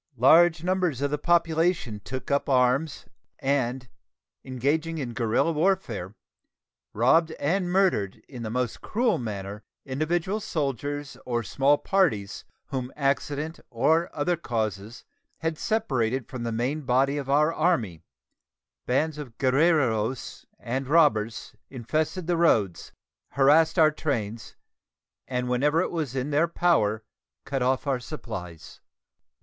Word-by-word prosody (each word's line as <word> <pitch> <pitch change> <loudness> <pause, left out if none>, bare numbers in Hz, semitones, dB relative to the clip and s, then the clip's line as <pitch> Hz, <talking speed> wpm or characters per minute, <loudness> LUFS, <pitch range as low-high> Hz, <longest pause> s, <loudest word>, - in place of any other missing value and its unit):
Large 160 +6 +5
numbers 180 -7 0
of 145 - 0
the 150 - -1
population 165 - +1
took 130 +6 -6
up 140 0 +1
arms, 130 +3 +1 0.3
and, 130 -2 -1 0.6
engaging 145 +6 -1
in 125 -6 -4
guerrilla 115 +8 +1
warfare, 150 - -1 0.8
robbed 160 +9 +3
and 175 +5 -1
murdered 180 - +2
in 125 -4 -9
the 110 - -4
most 125 +1 -2
cruel 235 0 0
manner 105 -3 -5 0.2
individual 165 +9 -1
soldiers 145 - -3
or 120 -1 -2
small 140 +6 +2
parties 135 - 0 0.2
whom 130 -2 -4
accident 145 +2 -1
or 160 +8 +2
other 165 +4 0
causes 110 - -4 0.3
had 160 -1 -3
separated 130 - -1
from 130 - -7
the 115 0 -2
main 125 +7 -1
body 135 +2 +1
of 135 -1 -6
our 150 +3 +3
Army; 120 - 0 0.9
bands 150 +4 0
of 125 -6 -9
guerrilleros 130 -5 +1
and 130 +3 -4
robbers 130 -8 +2 0.2
infested 155 +8 -2
the 175 0 0
roads, 105 - +1 0.4
harassed 150 +5 +4
our 155 -2 +6
trains, 115 -8 -4 0.7
and 125 -1 -2
whenever 145 +6 +2
it 185 - 0
was 150 -7 -3
in 135 +3 -2
their 155 +4 +3
power 110 -12 +1 0.4
cut 135 -2 -2
off 130 +2 +1
our 135 -3 0
supplies. 110 - -8
140 Hz, 125 wpm, -26 LUFS, 120-160 Hz, 0.9 s, our